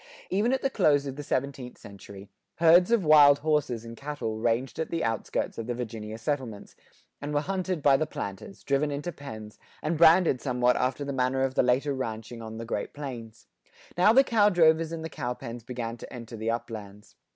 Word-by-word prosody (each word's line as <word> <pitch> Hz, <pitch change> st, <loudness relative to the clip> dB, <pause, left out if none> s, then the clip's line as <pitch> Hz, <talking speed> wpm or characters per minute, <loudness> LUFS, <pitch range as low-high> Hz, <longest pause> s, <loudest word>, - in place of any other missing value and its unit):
Even 205 Hz, +6 st, +2 dB
at 265 Hz, -, -1 dB
the 270 Hz, -, +2 dB
close 145 Hz, -, +3 dB
of 135 Hz, -1 st, -5 dB
the 145 Hz, -, -6 dB
seventeenth 135 Hz, -2 st, -3 dB
century, 100 Hz, 0 st, -12 dB, 0.3 s
herds 170 Hz, +3 st, +5 dB
of 230 Hz, -6 st, +2 dB
wild 145 Hz, -2 st, +7 dB
horses 145 Hz, -7 st, 0 dB
and 115 Hz, 0 st, -9 dB
cattle 140 Hz, -6 st, -5 dB
ranged 120 Hz, +5 st, -1 dB
at 160 Hz, -, -2 dB
the 165 Hz, -, -2 dB
outskirts 115 Hz, 0 st, -2 dB
of 115 Hz, -, -5 dB
the 120 Hz, -, -2 dB
Virginia 110 Hz, -2 st, -6 dB
settlements, 115 Hz, -4 st, -4 dB, 0.5 s
and 145 Hz, +1 st, -4 dB
were 145 Hz, -, +2 dB
hunted 185 Hz, -2 st, -3 dB
by 140 Hz, -1 st, +6 dB
the 155 Hz, +3 st, 0 dB
planters, 100 Hz, -, -7 dB
driven 140 Hz, +2 st, +1 dB
into 145 Hz, +5 st, -4 dB
pens, 110 Hz, -9 st, -10 dB, 0.2 s
and 155 Hz, +1 st, -2 dB
branded 165 Hz, -5 st, +5 dB
somewhat 125 Hz, -2 st, +1 dB
after 130 Hz, +3 st, -1 dB
the 140 Hz, -, -4 dB
manner 130 Hz, 0 st, 0 dB
of 135 Hz, -1 st, -1 dB
the -, -, +3 dB
later 130 Hz, +3 st, +1 dB
ranching 115 Hz, -2 st, -5 dB
on 110 Hz, 0 st, -8 dB
the 115 Hz, -, -6 dB
Great 105 Hz, -3 st, -4 dB
Plains.[88:1] 120 Hz, -6 st, -11 dB
Now 195 Hz, +4 st, +6 dB
the 265 Hz, +4 st, +6 dB
cow 215 Hz, -5 st, +3 dB
drovers 165 Hz, -3 st, +3 dB
and 165 Hz, -1 st, -5 dB
the -, -, -2 dB
cow 125 Hz, -5 st, -4 dB
pens[88:2] 115 Hz, -1 st, -8 dB
began 120 Hz, -2 st, -5 dB
to -, -, -11 dB
enter 115 Hz, -2 st, -8 dB
the 110 Hz, +1 st, -3 dB
uplands. 110 Hz, -3 st, -6 dB
135 Hz, 200 wpm, -27 LUFS, 115-155 Hz, 0.5 s, wild